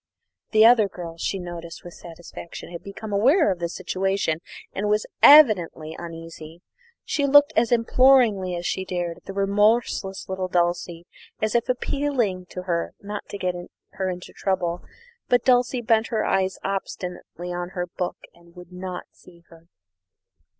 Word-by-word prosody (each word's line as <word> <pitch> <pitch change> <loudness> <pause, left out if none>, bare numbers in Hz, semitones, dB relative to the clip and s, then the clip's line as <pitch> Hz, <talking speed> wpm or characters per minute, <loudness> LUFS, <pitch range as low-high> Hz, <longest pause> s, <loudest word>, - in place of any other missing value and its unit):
The 220 0 +5
other 230 -3 +6
girl, 170 -3 -8
she 195 - -1
noticed 170 -2 -8
with 175 - -10
satisfaction, 170 0 -10
had 170 - -7
become 205 +1 -8
aware 255 - +4
of 180 - -3
the 170 0 -2
situation 185 -2 -1 0.3
and 205 +2 -2
was 210 0 +1 0.2
evidently 190 - +6
uneasy. 165 0 -10 0.4
She 285 -1 0
looked 290 +1 +6
as 235 - +2
imploringly 230 -6 +4
as 175 0 -5
she 190 - -1
dared 175 -2 -3
at 195 - -10
remorseless 200 0 +1
little 190 -1 -3
Dulcie, 175 -1 -1 0.3
as 215 0 -1
if 235 0 +1
appealing 245 -8 -1
to 180 - -7
her 170 -2 -2
not 205 0 -7
to 200 - -5
get 185 -2 -1 0.4
her 190 -1 -3
into 180 0 -7
trouble; 180 -3 -1 0.5
but 245 -1 +3
Dulcie 250 0 +3
bent 225 0 +2
her 220 -3 -1
eyes 190 -1 0
obstinately 180 -2 -5
on 175 +1 -5
her 180 - -1
book 175 0 -4 0.2
and 170 0 -22
would 180 0 -13
not 180 0 -6
see 170 -1 -19
her. 165 0 -18
190 Hz, 155 wpm, -24 LUFS, 175-215 Hz, 0.5 s, other